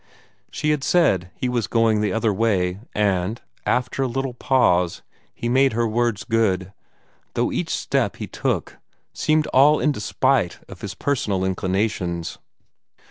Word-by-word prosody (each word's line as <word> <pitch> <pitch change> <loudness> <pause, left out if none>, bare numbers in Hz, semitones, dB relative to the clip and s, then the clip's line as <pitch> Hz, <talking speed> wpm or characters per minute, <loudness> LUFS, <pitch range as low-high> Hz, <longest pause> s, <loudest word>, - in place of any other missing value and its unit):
She 150 +1 -1
had 150 -3 0
said 100 - +2
he 125 - -2
was 120 -3 -1
going 115 -2 +2
the 105 -2 0
other 115 0 +1
way, 95 -4 +1 0.2
and, 100 +1 0 0.3
after 125 +2 0
a 135 - +2
little 135 +1 -2
pause, 120 -10 +2 0.3
he 120 - -5
made 130 +2 +3
her 115 +1 +1
words 115 -1 0
good, 100 -5 0 0.6
though - - +1
each - - -2
step - - 0
he - - -5
took - - -2 0.4
seemed 155 0 +1
all 145 +3 +6
in 150 - +2
despite 130 - 0
of - - -12
his 100 -2 -6
personal 100 -8 -1
inclinations. 95 -2 -2
115 Hz, 145 wpm, -22 LUFS, 95-130 Hz, 0.6 s, all